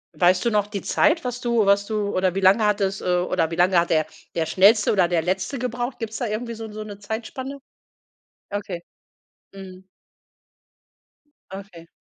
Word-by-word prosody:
Weißt 180 +3 +3
du 235 - +2
noch 210 -1 +1
die 200 -3 -5
Zeit, 320 0 +2
was 245 0 -4
du 235 -3 +2
was 200 0 +3
du 210 -2 -2
oder 185 0 +1
wie - - 0
lange 195 +4 +4
hattest 200 -1 0
äh, - - -8
oder 165 -2 0
wie 165 - -4
lange 180 0 +4
hat 170 - 0
der 155 -1 +2 0.3
der 165 -1 0
Schnellste 205 +5 +4
oder 185 -4 +3
der 170 -2 0
Letzte 190 +9 -2
gebraucht? 245 +1 -3
Gibt 225 -2 -5
es - - -5
da 245 - -1
irgendwie 230 +3 -4
so 220 -1 -8
so 215 0 -6
'ne 205 -1 -9
Zeitspanne? 235 +6 -6 0.9
Okay. 200 -4 -5 0.7
Mhm. 190 -1 -11 1.7
Okay. 190 -4 -10
200 Hz, 180 wpm, -23 LUFS, 185-225 Hz, 1.7 s, lange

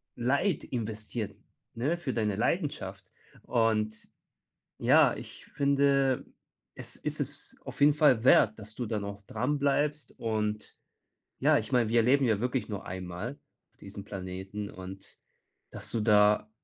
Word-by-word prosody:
Leid 140 +9 +1
investiert, 110 -2 -4 0.4
ne, 145 +9 -1
für 145 -7 -3
deine 105 -4 0
Leidenschaft - - -2 0.3
und, 110 -2 +1 0.8
ja, - - +5
ich - - -10
finde, 140 -2 +2 0.5
es - - -4
ist - - -1
es - - -4
auf - - -9
jeden 145 +1 +6
Fall 140 -6 +4
wert, 110 -4 +5
dass 110 +1 -11
du 120 - -3
dann 105 -2 -2
auch 100 0 -7
dran 145 +8 -2
bleibst 145 0 0
und 110 -1 -2 0.6
ja, - - +4
ich 110 - -4
meine, 120 -3 +3
wir 115 +1 +4
leben 135 +3 +4
ja 110 -4 +2
wirklich 125 -1 -1
nur 100 -3 -5
einmal 90 +8 -5 0.4
auf - - -38
diesem 100 0 -9
Planeten 95 +1 -6
und, 95 +1 -10 0.5
dass - - -6
du 115 - -1
da 105 0 +4
110 Hz, 145 wpm, -29 LUFS, 105-135 Hz, 0.8 s, jeden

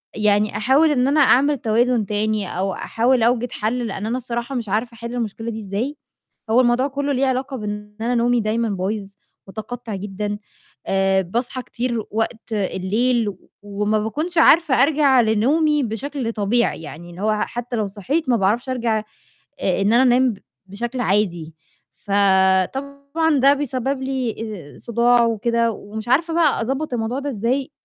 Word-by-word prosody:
يعني 210 0 +2
أحاول 275 +7 +3
إن 255 -3 +2
أنا 290 +2 +2
أعمل 285 +1 +4
توازن 235 0 +1
تاني، 210 0 -1
أو 190 +1 -1
أحاول 240 +4 +1
أوجِد 245 +1 +1
حل، 235 +3 -2
لإن 200 0 -5
أنا 235 +3 -1
الصراحة 240 +1 -4
مش 235 -4 -3
عارفة 225 +4 -1
أحِلّ 235 +1 -7
المشكلة 230 -1 -3
دي 220 0 -6
إزاي، 215 +9 -3 0.5
هو 235 +3 +5
الموضوع 250 +2 +2
كُلّه 285 +1 -2
ليه 270 0 +1
علاقة 265 +1 -1
بإن 210 -2 -6
أنا 240 +2 0
نومي 240 0 +2
دايمًا 225 +2 0
بايظ، 200 +1 -3 0.4
مُتقطع 225 +2 -6
جدًا، 205 +1 -4 0.5
آآ 195 0 +2
باصحى 240 +7 -3
كتير 240 -2 -3
وقت 225 +1 -3
الليل، 215 +4 0
و 190 -2 -9
وما 205 +1 -1
باكونش 305 +11 -2
عارفة 320 -3 +5
أرجَع 280 -3 +4
لنومي 285 +8 +2
بشكل 250 +1 -3
طبيعي، 220 -2 0
يعني 170 +3 -9
إن 175 - -12
هو 215 +1 0
حتّى 240 0 -4
لو 215 -2 0
صحيت، 260 - -2
ما 240 - +4
باعرفش 220 +6 0
أرجَع 235 -4 0 0.6
آآ - - 0
إن 200 +2 +2
أنا 240 +2 +5
أنام 255 0 +4
ب 200 - -11 0.3
بشكل 235 +6 -4
عادي، 180 -7 0 0.4
ف 205 - -16 0.6
طبعًا 280 +3 -1
ده 275 +2 +5
بيسبب 270 -1 -2
لي 260 -3 -2 0.4
آآ - - -15
صُداع 235 +1 +3
وكده، 230 +1 +1
ومش 215 +2 -8
عارفة 325 +6 +2
بقى 325 -4 +3
أضبّط 270 +5 -2
الموضوع 235 +2 -2
ده 285 +1 -4
إزاي، 255 +4 -1
235 Hz, 165 wpm, -21 LUFS, 210-260 Hz, 0.6 s, هو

